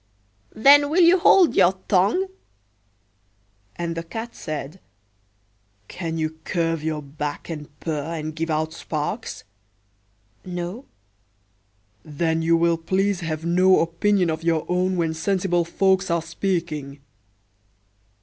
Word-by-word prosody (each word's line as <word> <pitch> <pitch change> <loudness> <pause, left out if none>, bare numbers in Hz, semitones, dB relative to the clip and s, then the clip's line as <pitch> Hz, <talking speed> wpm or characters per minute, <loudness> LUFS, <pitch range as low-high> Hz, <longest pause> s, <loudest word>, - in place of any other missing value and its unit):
"Then 285 +5 +6
will 345 +4 +4
you 350 +2 +6
hold 355 -1 +5
your 180 +2 +5
tongue!"And 100 - -4
the 165 - -3
Cat 225 +8 -7
said, 155 +2 -6 1.1
"Can 165 -2 -5
you 160 0 -3
curve 165 -3 -1
your 155 -1 -3
back, 145 +3 -6
and 150 -2 -7
purr, 160 0 -3
and 155 -1 -5
give 165 0 -3
out 155 0 -1 1.7
sparks?""No.""Then 100 - -7
you 165 +1 +3
will 170 0 +2
please 190 +3 0
have 160 -2 -4
no 185 +2 +4
opinion 175 +2 +1
of 160 0 -4
your 165 -2 +1
own 180 +1 0
when 165 -2 0
sensible 175 0 0
folks 190 +2 +1
are 170 -1 0
speaking." 165 -5 -3
165 Hz, 110 wpm, -23 LUFS, 145-185 Hz, 1.7 s, Then